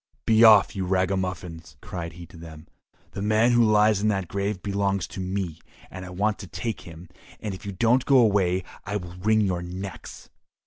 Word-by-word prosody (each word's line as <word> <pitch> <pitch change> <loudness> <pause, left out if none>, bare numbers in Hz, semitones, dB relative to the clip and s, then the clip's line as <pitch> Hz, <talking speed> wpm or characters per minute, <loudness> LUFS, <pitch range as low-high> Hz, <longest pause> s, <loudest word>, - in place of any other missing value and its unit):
"Be 110 0 +4
off, 110 -3 +7
you 95 - -2
ragamuffins!" 90 -5 -2
cried 85 0 -7
he 85 +1 -10
to - - -18
them, 80 -2 -12 0.4
"the - - -6
man 110 +3 +3
who 120 0 +4
lies 105 -1 +3
in 105 - +1
that 95 -4 0
grave 100 0 -3
belongs 100 -2 -1
to - - -9
me; 95 -3 -3 0.3
I 95 -1 -8
want 105 +4 -1
to 100 - -8
take 100 +5 -5
him, 85 +1 -12 0.3
and 105 -2 -5
if 95 - -9
you - - -3
don't 115 +7 +2
go 140 - +4
away 100 -6 +3 0.2
I 100 +1 -4
will 90 -4 -5
wring 110 +3 +2
your 90 -4 0
necks!" 95 +2 -8
95 Hz, 190 wpm, -25 LUFS, 90-105 Hz, 0.4 s, off